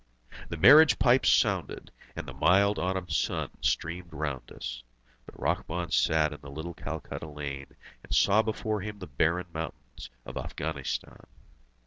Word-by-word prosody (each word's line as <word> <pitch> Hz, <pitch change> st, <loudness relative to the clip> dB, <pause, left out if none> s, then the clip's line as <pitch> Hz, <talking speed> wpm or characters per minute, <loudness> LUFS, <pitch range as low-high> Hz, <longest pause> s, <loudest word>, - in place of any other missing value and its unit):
The 85 Hz, -, -4 dB
marriage 145 Hz, -, +8 dB
pipes 125 Hz, 0 st, +4 dB
sounded, -, -, +1 dB, 0.2 s
and -, -, -6 dB
the -, -, -7 dB
mild 100 Hz, +3 st, +3 dB
autumn 95 Hz, 0 st, -2 dB
sun 75 Hz, -, -1 dB
streamed 85 Hz, +1 st, -1 dB
round 70 Hz, -5 st, -4 dB
us. -, -, -6 dB, 0.5 s
But -, -, -13 dB
Rahmun 85 Hz, 0 st, -2 dB
sat 80 Hz, -1 st, +3 dB
in 75 Hz, -, -11 dB
the 70 Hz, -, -10 dB
little 80 Hz, +5 st, -6 dB
Calcutta 80 Hz, 0 st, -6 dB
lane, 70 Hz, -2 st, -7 dB, 0.3 s
and -, -, -17 dB
saw 100 Hz, -, +4 dB
before 110 Hz, -1 st, -2 dB
him 105 Hz, +1 st, -6 dB
the 95 Hz, -, -8 dB
barren 80 Hz, +4 st, 0 dB
mountains 80 Hz, -6 st, -7 dB, 0.2 s
of -, -, -7 dB
Afghanistan. 70 Hz, -3 st, -4 dB
80 Hz, 145 wpm, -29 LUFS, 75-100 Hz, 0.5 s, marriage